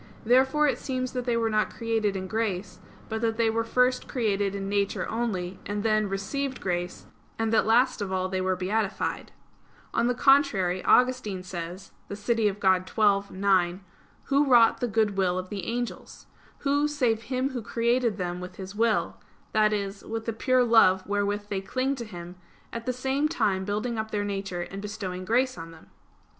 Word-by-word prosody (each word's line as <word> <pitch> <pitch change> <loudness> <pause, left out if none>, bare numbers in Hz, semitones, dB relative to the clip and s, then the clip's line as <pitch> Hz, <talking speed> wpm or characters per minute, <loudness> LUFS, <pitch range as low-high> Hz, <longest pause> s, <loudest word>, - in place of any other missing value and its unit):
Therefore 265 +5 +4
it 255 -4 0
seems 255 -1 -3
that 250 -1 -3
they 240 -2 +1
were 230 -1 +1
not 215 0 +1
created 225 -3 -1
in 190 0 -3
grace; 200 -2 -3 0.3
but 220 0 -3
that 225 -1 0
they 230 -1 +2
were 230 +1 0
first 250 +2 +1
created 205 -5 0
in 195 0 -4
nature 200 0 0
only, 195 -6 -3
and 205 0 -3
then 215 -2 +2
received 260 +8 -3
grace, 175 -1 -3 0.3
and 225 0 0
that 220 - +3
last 235 +1 +3
of 195 -2 -3
all 185 0 0
they 185 0 -2
were 185 0 +1
beatified. 195 +3 -2 0.6
On 235 +1 +2
the 250 - +1
contrary, 240 -11 +3
Augustine 250 -7 +3
says 180 +1 -7 0.2
(De 200 - -4
Civ. 210 -1 0
Dei 190 -2 +3
xii, 200 0 +1
9), 190 -1 +2 0.4
"Who 280 +1 +2
wrought 235 -3 +5
the 245 - 0
good 215 -3 +1
will 185 -2 +1
of 185 0 -4
the 195 -4 -5
angels? 240 +1 -5 0.4
Who, 285 +1 +2
save 250 -7 0
Him 260 +1 0
Who 250 -2 -4
created 235 0 0
them 180 -2 -3
with 180 0 -8
His 190 0 -8
will, 225 +1 +1 0.3
that 215 -1 +3
is, 200 -1 -3
with 225 0 -5
the 230 - -2
pure 255 +3 +2
love 205 -6 +5
wherewith 205 0 -1
they 195 -2 -2
cling 255 +7 -1
to 235 - -5
Him; 175 -3 -9 0.4
at 230 +1 -6
the - - +2
same 265 +4 0
time 205 - 0
building 215 +3 -2
up 220 0 -3
their 205 -1 -1
nature 195 -3 -3
and 195 +3 -6
bestowing 190 -3 -5
grace 250 0 +1
on 165 0 -7
them?" 165 -1 -16
215 Hz, 185 wpm, -27 LUFS, 190-240 Hz, 0.6 s, wrought